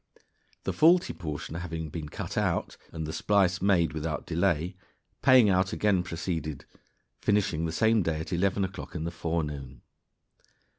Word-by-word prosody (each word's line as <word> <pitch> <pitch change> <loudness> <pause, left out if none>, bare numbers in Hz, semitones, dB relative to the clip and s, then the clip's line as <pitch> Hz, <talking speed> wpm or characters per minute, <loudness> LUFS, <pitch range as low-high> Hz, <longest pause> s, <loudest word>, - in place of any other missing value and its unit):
The - - -2
faulty 170 +3 +4
portion 75 -3 -6
having 80 -2 -4
been 75 -1 -6
cut - - -6
out, - - 0 0.2
and 80 -1 -4
the 80 - -5
splice 95 -2 +2
made 90 -5 +3
without 80 0 -3
delay, 85 0 0 0.5
paying 130 -4 +7
out 95 -1 +2
again 100 -4 +2
proceeded, 80 -4 -4 0.5
finishing 90 -6 +1
the - - -3
same 110 +5 +3
day 80 -3 -1
at 80 - -5
eleven 95 +2 +1
o'clock 95 -1 -8
in 80 - -3
the 85 - -3
forenoon. 75 -6 -4
85 Hz, 150 wpm, -28 LUFS, 80-95 Hz, 0.5 s, paying